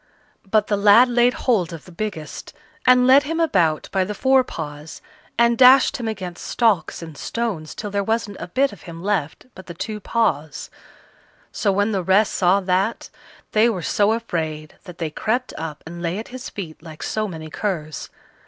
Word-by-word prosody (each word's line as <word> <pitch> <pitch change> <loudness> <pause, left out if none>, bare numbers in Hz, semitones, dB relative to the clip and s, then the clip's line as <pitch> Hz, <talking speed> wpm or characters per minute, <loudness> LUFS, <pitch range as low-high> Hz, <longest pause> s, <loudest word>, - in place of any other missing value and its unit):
But 215 0 +3
the 205 - 0
lad 210 +5 +6
laid 245 +1 +3
hold 195 -9 +2
of 165 -2 -9
the 180 - -13
biggest, 170 -4 -6 0.3
and 250 0 +6
led 265 +2 +7
him 325 +3 -3
about 175 - +1
by 190 -1 +1
the 210 +3 -4
fore 265 +2 +4
paws, 150 -7 -8 0.4
and 235 0 +4
dashed 260 +1 +7
him 235 - -4
against 185 -5 -6
stocks 210 -8 +1
and 160 -2 -9
stones 200 -6 -4
till 205 -1 -5
there 200 0 0
wasn't 220 -1 -2
a - - -6
bit 270 +8 +1
of 200 - -14
him 165 +1 -9
left 190 -7 -2
but 185 - -13
the 170 - -8
two 215 +4 -5
paws. 165 -10 -1 0.8
So 205 - 0
when 205 +3 +1
the 195 -3 0
rest 190 +4 +3
saw 190 +2 +3
that, 190 +4 -1 0.4
they 220 +2 +4
were 185 -7 -3
so 205 +1 +2
afraid 160 -9 -4
that 180 -3 -11
they 160 -2 -3
crept 240 +9 -2
up 155 -2 -6
and 170 +1 -8
lay 170 +2 -2
at 220 - -7
his 255 +1 -7
feet 165 -7 -8
like 160 -2 -10
so 215 0 -2
many 160 -4 -8
curs. 155 -7 -4
200 Hz, 190 wpm, -22 LUFS, 165-230 Hz, 0.8 s, led